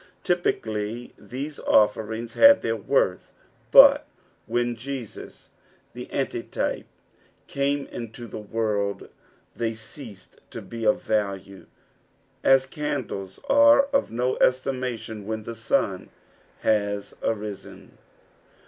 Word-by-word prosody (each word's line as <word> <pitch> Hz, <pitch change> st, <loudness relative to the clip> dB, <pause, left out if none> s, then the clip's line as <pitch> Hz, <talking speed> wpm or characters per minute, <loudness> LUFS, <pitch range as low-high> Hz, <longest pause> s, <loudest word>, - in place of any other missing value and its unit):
Typically 115 Hz, -9 st, -2 dB
these 140 Hz, +4 st, -7 dB
offerings 110 Hz, +2 st, +1 dB
had 280 Hz, 0 st, +7 dB
their -, -, 0 dB
worth, -, -, 0 dB, 0.4 s
but 285 Hz, +2 st, +8 dB, 0.4 s
when 120 Hz, +1 st, 0 dB
Jesus, 125 Hz, -1 st, -8 dB, 0.4 s
the -, -, -9 dB
Antitype, -, -, -2 dB, 0.6 s
came 140 Hz, 0 st, -1 dB
into 120 Hz, 0 st, -8 dB
the 110 Hz, -, -7 dB
world, 105 Hz, -2 st, -2 dB, 0.5 s
they 115 Hz, -1 st, -2 dB
ceased 110 Hz, -3 st, -10 dB
to -, -, -7 dB
be 115 Hz, -1 st, -7 dB
of 105 Hz, -, +2 dB
value, 100 Hz, -2 st, -2 dB, 0.8 s
as 135 Hz, 0 st, +5 dB
candles 100 Hz, -9 st, -4 dB
are 285 Hz, 0 st, +6 dB
of 275 Hz, -, +2 dB
no 125 Hz, +3 st, -1 dB
estimation 125 Hz, -5 st, -1 dB
when 110 Hz, 0 st, -3 dB
the 115 Hz, -, -6 dB
sun 115 Hz, 0 st, -1 dB, 0.5 s
baa 100 Hz, -1 st, +2 dB, 0.2 s
arisen. 105 Hz, -2 st, -5 dB
115 Hz, 105 wpm, -25 LUFS, 105-135 Hz, 0.8 s, but